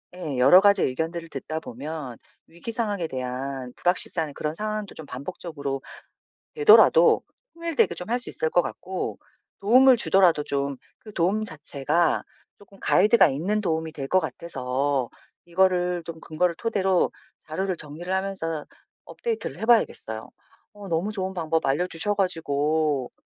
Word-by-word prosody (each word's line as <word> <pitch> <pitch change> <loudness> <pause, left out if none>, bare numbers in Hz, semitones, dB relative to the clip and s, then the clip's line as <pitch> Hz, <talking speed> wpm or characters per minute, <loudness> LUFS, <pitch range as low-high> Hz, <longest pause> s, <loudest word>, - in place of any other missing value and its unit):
예. 160 -7 -4
여러 140 +9 +8
가지 200 0 +5
의견들을 165 +5 -2
듣다 160 0 -5
보면 140 -2 -7 0.3
위기 170 +7 -7
상황에 210 -7 -2
대한 130 -1 -5
불확실한 170 -3 0
그런 150 +2 -3
상황도 215 +1 -4
좀 160 - -3
반복적으로 140 0 -5 0.7
되더라도 435 -1 +6 0.3
통일되게 335 -2 +1
좀 180 - -4
할 240 +2 +1
수 245 - -10
있을 160 - -2
것 175 - +3
같고 185 +1 -5 0.4
도움을 250 +5 +6
주더라도 185 -8 +4
좀 140 -1 -2 0.2
그 215 - -13
도움 195 +5 +1
자체가 155 0 0 0.3
쪼끔 200 -1 -19
가이드가 210 +3 +5
있는 180 +10 -1
도움이 160 -4 -1
될 135 -3 -5
것 185 - +4
같아서 135 -6 -2 0.4
이거를 180 -1 +1
좀 165 -1 -7
근거를 170 +2 -1
토대로 190 -3 +1 0.4
자료를 185 +4 -2
정리를 155 +4 -7
하면서 190 -5 -2 0.4
업데이트를 460 -2 -4
해 - - -3
봐야겠어요. 160 - +1 0.4
어 205 -1 -10
너무 170 +5 0
좋은 190 -2 -3
방법 165 -2 -1
알려주셔 165 +7 0
가지고 155 -6 0
170 Hz, 320 characters per minute, -25 LUFS, 150-195 Hz, 0.7 s, 여러